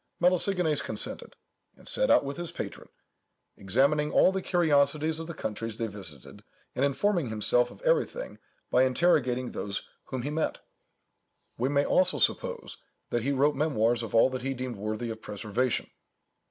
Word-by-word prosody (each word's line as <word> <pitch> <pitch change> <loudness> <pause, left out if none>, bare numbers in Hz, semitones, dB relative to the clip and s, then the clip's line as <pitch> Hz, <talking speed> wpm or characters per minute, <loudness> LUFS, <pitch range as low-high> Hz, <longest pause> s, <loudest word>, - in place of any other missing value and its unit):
Melesigenes 180 -2 +2
consented, - - -5 0.4
and - - -16
set - - +1
out - - +5
with 140 +1 -5
his 175 -1 -5
patron, - - -7 0.7
"examining 140 +10 +2
all - - +5
the 190 0 -2
curiosities 155 -2 +2
of 165 - -6
the 170 - -6
countries 115 -3 -4
they 115 - -1
visited, 95 - -8 0.3
and 130 - -1
informing 160 - +1
himself 110 +3 +2
of - - -15
everything - - 0 0.3
by 125 - +4
interrogating 130 -3 +2
those 100 -1 -4 0.2
whom 130 -2 -4
he 145 - -3
met." 155 +1 -1 1.0
We 125 +3 0
may 140 0 +2
also 185 0 +3
suppose, 485 -2 -1 0.3
that 120 - +1
he 135 +5 0
wrote 140 +2 +3
memoirs 120 -6 +1
of 115 -1 -5
all 115 +3 +5
that 130 -1 -4
he 135 +1 -2
deemed 125 -3 -5
worthy 110 +3 -3
of 110 0 -8
preservation. 105 +4 -2
135 Hz, 160 wpm, -28 LUFS, 115-160 Hz, 1.0 s, out